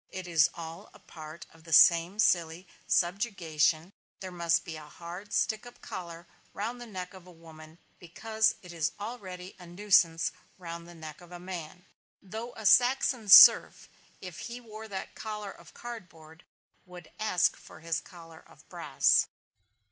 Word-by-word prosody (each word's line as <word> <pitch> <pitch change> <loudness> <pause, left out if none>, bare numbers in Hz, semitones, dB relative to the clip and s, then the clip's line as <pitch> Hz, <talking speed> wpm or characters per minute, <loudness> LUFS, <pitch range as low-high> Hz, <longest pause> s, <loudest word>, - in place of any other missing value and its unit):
It 185 -1 -7
is 160 -5 +4
all 165 0 -9
a - - -13
part 155 0 -11
of 160 0 -20
the 165 - -12
same 170 +4 +6
silly 170 -3 +1 0.2
subjugation; 175 -3 0 0.3
there 185 -1 -7
must 170 -1 0
be 165 - -7
a 155 -1 -10
hard 175 +6 -10
stick 220 -1 0
up 240 - -15
collar 170 -2 -8 0.3
round 235 +4 -4
the 240 - -9
neck 185 -3 -7
of 185 -1 -14
a - - -13
woman, 160 -1 -15 0.2
because 220 +5 -1
it 180 -1 -11
is 165 -2 -1
already 190 -5 -8
a 180 - -12
nuisance 175 -3 +2 0.3
round 170 -2 -8
the 175 - -13
neck 155 0 -10
of 175 0 -16
a 175 - -9
man. 180 -1 -8 0.3
Though 220 +5 -8
a 220 - -9
Saxon 245 +1 +3
serf, - - +8 0.3
if 180 -4 -9
he 240 +1 -7
wore 220 -2 -11
that 195 -2 -7
collar 210 -2 -6
of - - -17
cardboard, 175 -9 -11 0.4
would 175 -3 -13
ask 215 -5 +1
for 155 - -15
his 165 -1 -2
collar 165 -2 -14
of - - -21
brass. - - +2
180 Hz, 165 wpm, -29 LUFS, 165-205 Hz, 0.4 s, serf